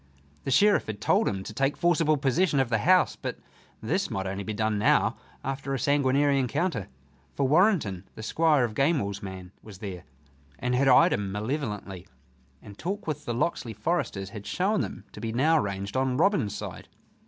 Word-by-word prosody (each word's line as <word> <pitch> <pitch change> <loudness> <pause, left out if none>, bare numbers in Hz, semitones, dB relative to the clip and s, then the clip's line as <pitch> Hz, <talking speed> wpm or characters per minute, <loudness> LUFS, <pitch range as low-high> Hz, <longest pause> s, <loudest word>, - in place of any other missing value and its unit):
The - - -2
Sheriff 205 +10 +4
had 105 -2 -5
told - - +2
him 95 -1 -2
to 110 - -8
take 135 +5 0
forcible 165 -3 +2
possession 140 +3 +2
of 135 -3 +1
the 115 -2 +1
house, 185 - +4
but - - -5 0.5
this - - 0
might 95 - -3
only 95 +1 -3
be 110 - -4
done 110 0 0
now 105 - +3 0.3
after 135 0 -3
a - - -3
sanguinary 140 +1 +2
encounter. 130 - -1 0.5
For 140 - +1
Warrenton, 150 - +2
the 110 - -8
Squire 150 +3 +3
of 115 -3 -1
Gamewell's 120 - 0
man, 95 -2 -8
was 105 -3 -12
there, 95 -3 -7 0.5
and 125 +1 -2
had 135 +2 +2
eyed 130 - +6
him 100 -1 -2
malevolently, 105 - -4 0.6
and 100 -1 -12
talk 200 +5 -4
with 150 -2 -4
the 120 - -2
Locksley 120 -3 -1
foresters 105 - -2
had 100 -2 -8
shown 200 - +1
them - - -5
to - - -10
be 115 - -3
now 155 +7 +3
ranged 100 -1 -4
on 130 -1 +1
Robin's 160 - +2
side. - - -7
125 Hz, 185 wpm, -27 LUFS, 100-150 Hz, 0.6 s, eyed